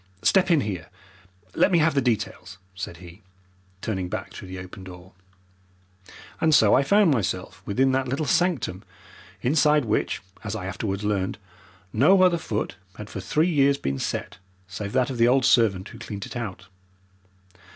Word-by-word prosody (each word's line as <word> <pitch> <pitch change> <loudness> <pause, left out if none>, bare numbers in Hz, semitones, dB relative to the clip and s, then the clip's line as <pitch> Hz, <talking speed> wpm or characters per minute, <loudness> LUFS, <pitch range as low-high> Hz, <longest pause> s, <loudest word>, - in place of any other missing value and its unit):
Step 190 -2 +4
in 165 -4 +4
here! 95 -7 -5 0.6
Let - - +3
me 175 - +4
have 160 -1 +3
the 140 - +2
details!" 100 -6 -2 0.2
said 90 -2 -6
he, 90 +2 -13 0.6
turning 95 -5 -3
back - - -5
through 95 - -9
the 95 0 -7
open 90 +1 -9
door. 90 0 -12 1.3
And 160 -2 +4
so 105 -2 +5
I - - +5
found 200 +5 +4
myself 95 -5 -2
within 130 +6 +2
that 130 0 0
little 140 +5 -1
sanctum, 130 - 0 0.6
inside 150 +1 +3
which, 110 -2 -1 0.2
as 110 -1 -4
I 100 -4 -5
afterwards 95 +1 -3
learned, 100 -2 -1 0.6
no 185 - +5
other 175 -2 +4
foot 105 -7 -3 0.2
had 105 0 -9
for - - -5
three 160 +4 +1
years 140 -2 +3
been 70 - -3
set - - -4 0.3
save 100 +2 -6
that 130 0 +1
of 125 - -5
the 115 - +5
old 130 +1 +3
servant 100 -6 +3
who - - -12
cleaned 100 -1 -6
it - - -10
out. 100 -5 -5
110 Hz, 170 wpm, -25 LUFS, 95-140 Hz, 1.3 s, so